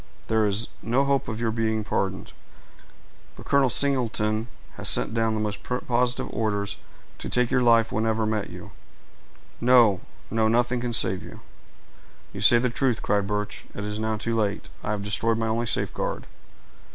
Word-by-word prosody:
There 110 -1 +3
is 105 +3 0
no 125 +5 +1
hope 140 -1 +1
of 110 0 -4
your 115 -1 0
being 110 -1 -1
pardoned; 95 -2 -3 1.0
for - - -11
Colonel 140 -2 +3
Singleton 115 -5 +1 0.3
has - - +1
sent - - +3
down 115 -1 +1
the - - -2
most 105 -1 -2
positive 125 0 0
orders 100 -2 -2 0.4
to - - -5
take 125 0 +1
your 130 -1 +3
life 115 -2 +4
whenever 110 0 0
we 110 - -1
met 105 -2 -2
you. - - -10 0.9
No, 120 -6 +5 0.3
no—nothing 120 +2 +1
can 120 -1 -3
save 95 -4 +1
you." - - -11 0.9
"You - - -6
say 120 - +7
the 125 0 0
truth," 125 -2 0
cried 100 -1 +1
Birch. 105 0 -3
"It 100 - -5
is 105 +1 -4
now 110 0 -1
too 115 +1 -2
late—I 105 -1 -3
have 105 -1 -2
destroyed 110 +3 +1
my 115 - -1
only 115 +1 -1
safeguard. - - -1
110 Hz, 165 wpm, -25 LUFS, 105-120 Hz, 1.0 s, say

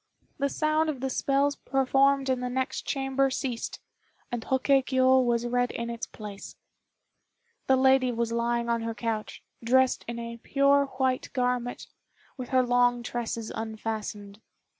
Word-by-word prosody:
The 280 +1 +1
sound 310 +2 +1
of 285 -4 -3
the 265 +1 -2
spells 280 +2 +1
performed 270 +1 +2
in 260 -1 +1
the 250 0 -3
next 260 +1 -3
chamber 270 0 +1
ceased, 255 -3 -4 0.5
and 240 -2 -3
Hoke 265 +2 0
kiô 260 -1 +4
was 240 -1 +1
read 245 0 +1
in 235 0 -4
its 235 0 -5
place. 205 -2 -9 1.1
The 265 - +5
lady 265 -1 +4
was 235 -1 -2
lying 235 0 0
on 235 -1 0
her 225 0 -4
couch, 225 -2 -4 0.2
dressed 260 +2 +3
in 235 0 -4
a 235 0 -6
pure 280 +3 +3
white 260 -1 0
garment, 250 -2 -1 0.5
with 255 -2 -7
her 255 -1 +3
long 245 0 +2
tresses 230 -2 -4
unfastened. 220 -2 -5
250 Hz, 150 wpm, -27 LUFS, 235-265 Hz, 1.1 s, The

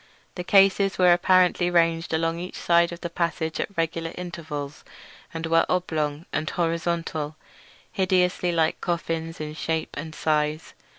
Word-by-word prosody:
The 180 - -5
cases 195 +1 +4
were 180 -1 +6
apparently 180 0 +3
ranged 165 -1 +2
along 165 +1 0
each 180 +1 -7
side 170 0 +3
of 170 - -8
the 170 - -4
passage 165 -2 -2
at - - -1
regular 165 0 -1
intervals, 155 -5 -6 0.5
and 165 0 -5
were 165 0 +4
oblong 160 -4 -1
and 155 - -1
horizontal, 165 -3 -2 0.6
hideously 180 -2 +1
like 165 -1 +1
coffins 165 -1 -3
in 155 0 -5
shape 160 0 -2
and 155 +2 -6
size. 155 0 -1
165 Hz, 140 wpm, -25 LUFS, 160-175 Hz, 0.6 s, were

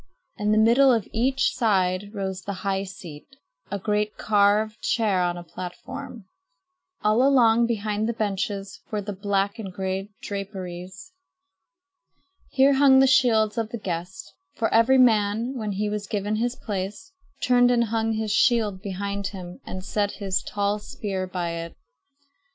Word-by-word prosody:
In 210 0 0
the 215 - +3
middle 240 +5 +5
of 225 -5 +1
each 265 +4 +1
side 195 -4 +1
rose 190 -3 -4
the 200 - -5
high 195 0 0
seat, 175 -6 -10 0.4
a 200 - -2
great 210 +1 -1
carved 210 +1 +2
chair 210 -6 +1
on 175 0 0
a 175 - -7
platform. 225 +7 -8 0.8
All 215 +3 +3
along 235 -4 +4
behind 215 -1 -1
the - - 0
benches 200 -2 -3
were 210 -2 -3
the 205 +1 -5
black 200 +1 -1
and 195 -4 -6
gray 190 +1 -3
draperies. 190 - -7 1.4
Here 275 +1 +4
hung 270 -1 +6
the 265 - +6
shields 230 -5 +3
of 225 -1 -2
the 235 - -5
guests; 180 - -6 0.2
for 225 - -1
every 230 +4 +5
man, 225 0 +3
when 215 -4 -3
he 210 +2 -1
was 205 -1 -3
given 205 +1 -2
his 240 +2 -1
place, 205 - -5 0.3
turned 245 -1 +4
and 240 -1 +3
hung 225 0 0
his 220 -1 -2
shield 215 -4 +2
behind 200 0 -3
him 180 -2 -9
and 185 0 -6
set 205 0 -1
his 195 -3 -1
tall 205 0 -1
spear 195 -2 -4
by 180 -2 -3
it. 170 0 -6
210 Hz, 155 wpm, -25 LUFS, 195-230 Hz, 1.4 s, hung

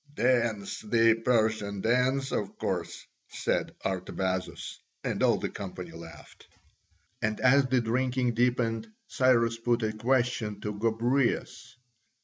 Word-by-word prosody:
"Dance 120 -6 +1
the 115 +1 +4
Persian 110 -4 +1
dance, 125 +4 +1
of - - -3
course," - - -3 0.2
said - - -2
Artabazus. 95 0 -3 0.2
And - - -2
all - - +4
the - - -2
company 90 -3 -7
laughed. 80 -1 -13 0.7
And 110 -1 -1
as 130 +1 +5
the 130 -1 +2
drinking 125 +1 0
deepened 115 -2 +1 0.2
Cyrus 115 -3 +2
put 120 0 +1
a 110 0 0
question 115 -2 0
to 105 - -3
Gobryas. 115 +6 0
115 Hz, 120 wpm, -28 LUFS, 105-125 Hz, 0.7 s, as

